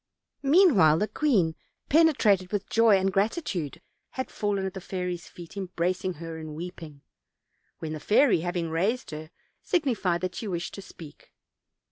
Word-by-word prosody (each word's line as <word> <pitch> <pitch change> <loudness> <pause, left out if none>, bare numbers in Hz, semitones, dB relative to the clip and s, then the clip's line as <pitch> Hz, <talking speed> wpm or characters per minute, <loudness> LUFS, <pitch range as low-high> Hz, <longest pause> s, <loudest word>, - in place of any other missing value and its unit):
Meanwhile, 275 - +5
the 210 - 0
queen, 205 - +2 0.3
penetrated 225 - +4
with 205 -2 -3
joy 225 -3 +5
and 190 0 0
gratitude, 195 - -1 0.3
had 260 - -5
fallen 200 -2 -1
at 190 - -4
the 190 - -7
fairy's 180 -2 -4
feet, 175 0 -12
embracing 185 -1 -2
her 165 0 -7
and 155 -1 -7
weeping; 160 -4 -8 0.7
when 155 -1 -5
the 155 - -5
fairy, 215 - +4
having 175 -1 -2
raised 195 +7 -1
her, 155 +1 -7 0.3
signified 230 - 0
that 185 -1 -2
she 220 - -5
wished 175 -3 -3
to 200 - -7
speak. 165 -5 -13
185 Hz, 150 wpm, -27 LUFS, 165-210 Hz, 0.7 s, Meanwhile